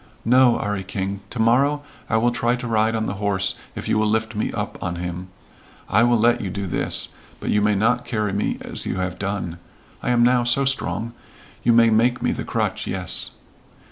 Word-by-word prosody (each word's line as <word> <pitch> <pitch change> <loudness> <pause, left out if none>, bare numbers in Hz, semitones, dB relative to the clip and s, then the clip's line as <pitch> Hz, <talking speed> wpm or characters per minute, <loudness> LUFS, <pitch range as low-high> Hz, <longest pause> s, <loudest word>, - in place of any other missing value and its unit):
"No, 125 0 +5
'Arry 105 -2 -2
King. 95 +1 -3
To - - -7
morrow 135 +6 +3 0.3
I 110 - +2
will 120 +2 +2
try 120 0 +1
to 125 0 -6
ride 110 0 +2
on 110 0 -1
the 95 - -2
horse 95 -2 +1 0.2
if - - -5
you 105 - +2
will 110 - +2
lift 110 +1 0
me 110 - -1
up - - -5
on 85 0 -2
him. 90 +1 -5 0.6
I 105 - +3
will 120 0 +4
let 115 +2 +3
you 100 - -3
do 100 +2 -4
this. 90 - -1 0.3
But - - -2
you 105 - +3
may 105 0 +3
not 120 +5 +2
carry 105 -4 -2
me 100 - -1
as - - -6
you - - -1
have 90 -1 -3
done. 95 -4 -3 0.4
I - - -2
am 120 -1 +4
now 125 0 +4
so 125 +3 +3
strong. 115 -4 -1 0.5
You 120 - +3
may 115 0 +6
make 120 +3 +3
me - - 0
the - - -3
crutch, - - -2
yes." - - -1
110 Hz, 210 wpm, -22 LUFS, 100-120 Hz, 0.6 s, may